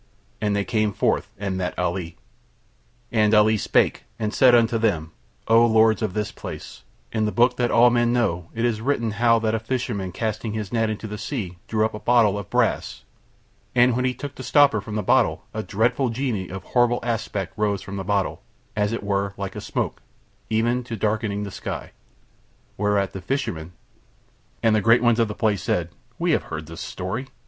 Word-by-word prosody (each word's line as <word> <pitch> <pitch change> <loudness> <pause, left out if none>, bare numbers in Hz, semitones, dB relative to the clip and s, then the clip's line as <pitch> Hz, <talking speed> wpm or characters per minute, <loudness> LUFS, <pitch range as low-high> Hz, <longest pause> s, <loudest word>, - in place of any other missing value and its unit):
And 105 -1 +1
they 100 -1 0
came 110 -3 0
forth - - 0
and 100 -1 -3
met 90 -1 -3
Ali. 90 -2 -2 0.9
And 110 -1 +3
Ali 105 +1 +5
spake 105 - +1
and 110 -1 -2
said 125 -2 +6
unto 115 -1 +3
them: 85 -8 0 0.4
"O 115 +1 +6
lords 110 -1 +4
of 105 -4 -2
this 105 0 -1
place; 75 -6 -8 0.3
in 110 -1 0
the 105 - 0
book 120 +5 +3
that 120 -1 +1
all 120 +1 +6
men 120 0 +2
know 90 -9 0
it 115 +1 0
is 110 -3 0
written 115 -3 0
how 115 +2 +3
that 110 -1 0
a 115 - +1
fisherman 110 -5 -3
casting 110 +2 -3
his 105 -2 -4
net 115 -1 +1
into 110 +1 -4
the 105 -1 -6
sea 105 -7 -4
drew 110 -1 +1
up 110 - -3
a 105 - -6
bottle 110 -4 +3
of 100 - -8
brass, - - 0 0.7
and 120 0 +5
when 125 - 0
he 125 0 0
took 145 -1 -6
the - - -9
stopper 130 -3 +4
from 105 +1 -7
the 105 - -1
bottle - - +2
a 110 - -2
dreadful 120 +5 +1
genie 115 -6 -2
of 95 0 -7
horrible 120 -1 +2
aspect 110 -5 -2
rose 105 -2 0
from 100 0 -6
the 95 - -3
bottle, 100 0 -1 0.3
as 105 +1 0
it 115 - -3
were 100 0 -1
like 100 -1 -5
a - - -5
smoke, - - -3 0.5
even 120 +3 +1
to 120 -1 -5
darkening 105 -1 -1
the 100 - -6
sky, - - -6 0.8
whereat 100 -1 0
the 95 - -6
fisherman..." 90 - -3 0.9
And 110 -1 +4
the 105 - +2
great 115 +4 +4
ones 120 -1 +4
of 115 - +3
that 105 - -6
place 105 -4 +1
said: 85 -2 -1 0.3
"We 170 0 +1
have - - +1
heard 80 0 -6
the 80 +2 -10
story." 95 +9 -5
110 Hz, 200 wpm, -23 LUFS, 100-120 Hz, 0.9 s, said